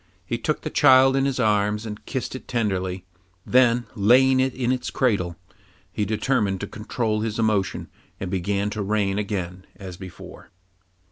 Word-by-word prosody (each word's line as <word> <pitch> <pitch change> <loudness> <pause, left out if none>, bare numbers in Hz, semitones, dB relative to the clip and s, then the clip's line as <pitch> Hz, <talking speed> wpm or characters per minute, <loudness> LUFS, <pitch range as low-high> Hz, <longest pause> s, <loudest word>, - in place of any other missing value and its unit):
He 115 +5 -3
took 150 +5 -1
the - - -5
child 135 -2 +6
in 135 0 +2
his 135 -2 -1
arms 105 -1 +1
and 105 -1 -7
kissed 130 -3 -3
it 130 - -8
tenderly; 95 -6 -2 0.4
then 120 -1 +3
laying 130 +5 +4
it 130 0 +2
in 125 -1 0
its 130 -1 -2
cradle, 100 -9 0 0.6
he 105 +3 -1
determined 105 -2 0
to 100 - -4
control 110 0 -2
his 110 -1 -3
emotion 105 -4 0 0.3
and 95 -1 -4
began 100 +2 -1
to 105 - -3
reign 100 -1 0
again 95 -3 -4
as 95 -3 -9
before. 95 -2 -11
105 Hz, 160 wpm, -23 LUFS, 100-125 Hz, 0.6 s, child